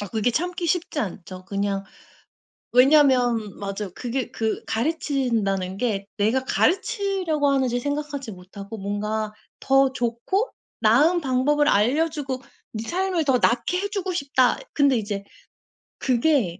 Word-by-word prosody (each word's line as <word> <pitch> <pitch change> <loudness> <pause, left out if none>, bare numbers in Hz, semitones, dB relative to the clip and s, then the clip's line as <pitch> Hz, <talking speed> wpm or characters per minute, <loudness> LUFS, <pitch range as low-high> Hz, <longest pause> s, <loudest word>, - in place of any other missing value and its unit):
아 205 - -4
그게 225 +2 0
참기 350 +5 -2
쉽지 330 -2 -1
않죠. 185 -2 -6
그냥 200 0 -2 0.9
왜냐면 250 -5 +4
맞아요. 200 -1 -4
그게 255 +1 -3
그 220 -1 -2
가르친다는 225 - -1
게 200 -4 -1
내가 230 +6 +1
가르치려고 375 - +1
하는지 255 -3 +1
생각하지 285 -3 -3
못하고 200 +4 -9
뭔가 210 +2 -2 0.3
더 270 0 +3
좋고 245 - -1 0.3
나은 295 +11 +4
방법을 290 +2 +2
알려 275 +11 +3
주고 270 -4 -5 0.3
네 220 0 -5
삶을 365 -2 0
더 265 -3 +3
낫게 240 +11 +1
해 405 - -2
주고 385 -3 -2
싶다. 275 -5 +2
근데 280 -3 +3
이제 205 -2 -3 0.8
그게 245 - +1
250 Hz, 270 characters per minute, -24 LUFS, 210-295 Hz, 0.9 s, 왜냐면